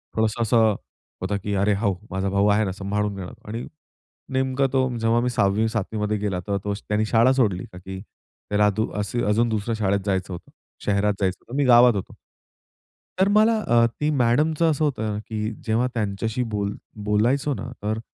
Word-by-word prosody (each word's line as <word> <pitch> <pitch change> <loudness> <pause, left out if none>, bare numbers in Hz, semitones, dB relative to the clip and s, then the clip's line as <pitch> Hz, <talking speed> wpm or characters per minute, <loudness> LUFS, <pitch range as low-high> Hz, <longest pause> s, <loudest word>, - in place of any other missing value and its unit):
थोडंसं 110 +1 0
असं 110 -2 +3 0.5
होतं 100 +2 -1
की 105 - -2
अरे 100 +2 +2
हो, 100 -1 +1 0.2
माझा 95 +1 -1
भाऊ 100 +1 +2
आहे 105 +1 +3
ना, 95 - -2
सांभाळून 105 +1 -2
घेणार 95 -2 -7 0.2
आणि 115 +3 -4 0.7
नेमकं 130 +1 +1
तो, 130 -1 +2
जेव्हा 115 +1 +2
मी 125 - 0
6वी-7वीमध्ये 105 0 0
गेला, 100 -3 -2
तेव्हा 100 +2 -2
तो 100 0 -1
त्यांनी 105 +1 +1
शाळा 115 +4 +4
सोडली. 105 -9 +1
का - - -9
की, 95 +1 -8 0.5
त्याला 105 0 +3
अ, - - +4
दु 110 +1 0
असु 110 +4 -2
अजून 115 +3 +2
दुसरं 110 +1 -1
शाळेत 100 -1 +1
जायचं 95 -1 -1
होतं. 85 - -10 0.3
शहरात 105 0 +2
जायचं 95 -1 0
होतं. 125 - -7
मी 145 - +3
गावात 120 -1 +7
होतो. 100 - -5 1.0
तर 190 - +4
मला 215 +2 +4
अ, 120 0 +5
ती 150 +6 -2
मॅडमचं 150 +5 +2
असं 155 +1 -1
होतं 110 -7 -1
ना, 105 - -3
की 110 0 -4 0.2
जेव्हा 115 +3 +1
त्यांच्याशी 110 +2 -2
बोल 100 -1 -1 0.3
बोलायचो 125 +8 +2
ना - - -6 0.2
तर 110 +1 -1
110 Hz, 185 wpm, -23 LUFS, 100-120 Hz, 1.0 s, गावात